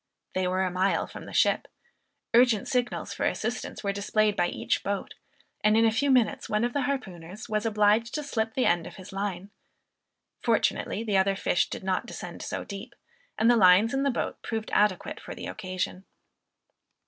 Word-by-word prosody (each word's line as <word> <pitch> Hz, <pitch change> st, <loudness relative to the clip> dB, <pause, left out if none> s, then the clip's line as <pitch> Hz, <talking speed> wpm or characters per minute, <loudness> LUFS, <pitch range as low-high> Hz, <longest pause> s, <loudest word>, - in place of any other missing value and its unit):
They 185 Hz, -1 st, 0 dB
were 185 Hz, +1 st, +1 dB
a 185 Hz, -, -1 dB
mile 185 Hz, +2 st, +1 dB
from -, -, -10 dB
the -, -, -9 dB
ship. -, -, +2 dB, 0.7 s
Urgent 235 Hz, -3 st, +4 dB
signals 250 Hz, -1 st, -1 dB
for -, -, -4 dB
assistance -, -, -3 dB
were 200 Hz, -1 st, 0 dB
displayed 210 Hz, +1 st, +1 dB
by 175 Hz, -, +2 dB
each -, -, -1 dB
boat, 200 Hz, 0 st, -3 dB, 0.5 s
and 215 Hz, +1 st, +4 dB
in 225 Hz, -, +5 dB
a 225 Hz, -, +4 dB
few 280 Hz, +6 st, +1 dB
minutes 250 Hz, -5 st, +2 dB
one 210 Hz, +1 st, +1 dB
of 240 Hz, 0 st, 0 dB
the 285 Hz, -, 0 dB
harpooners 195 Hz, -8 st, -4 dB
was 215 Hz, +1 st, 0 dB
obliged 215 Hz, +2 st, +2 dB
to 300 Hz, -, -2 dB
slip 225 Hz, -5 st, -2 dB
the 255 Hz, -, +2 dB
end 170 Hz, -1 st, +2 dB
of -, -, -11 dB
his 190 Hz, 0 st, -11 dB
line. 195 Hz, 0 st, -4 dB, 0.9 s
Fortunately 220 Hz, -, +1 dB
the 210 Hz, -4 st, +1 dB
other 195 Hz, +1 st, +3 dB
fish 180 Hz, -, +1 dB
did -, -, -6 dB
not 190 Hz, +5 st, -1 dB
descend 180 Hz, -7 st, -7 dB
so -, -, -4 dB
deep, 200 Hz, -1 st, -8 dB, 0.4 s
and 220 Hz, -, +3 dB
the 240 Hz, -, +6 dB
lines 200 Hz, +3 st, +6 dB
in 270 Hz, -, +1 dB
the 280 Hz, -, +2 dB
boat 250 Hz, -, -3 dB
proved 220 Hz, -1 st, -4 dB
adequate 205 Hz, -3 st, +1 dB
for -, -, -8 dB
the -, -, -7 dB
occasion. 185 Hz, 0 st, -4 dB
210 Hz, 190 wpm, -27 LUFS, 190-230 Hz, 0.9 s, the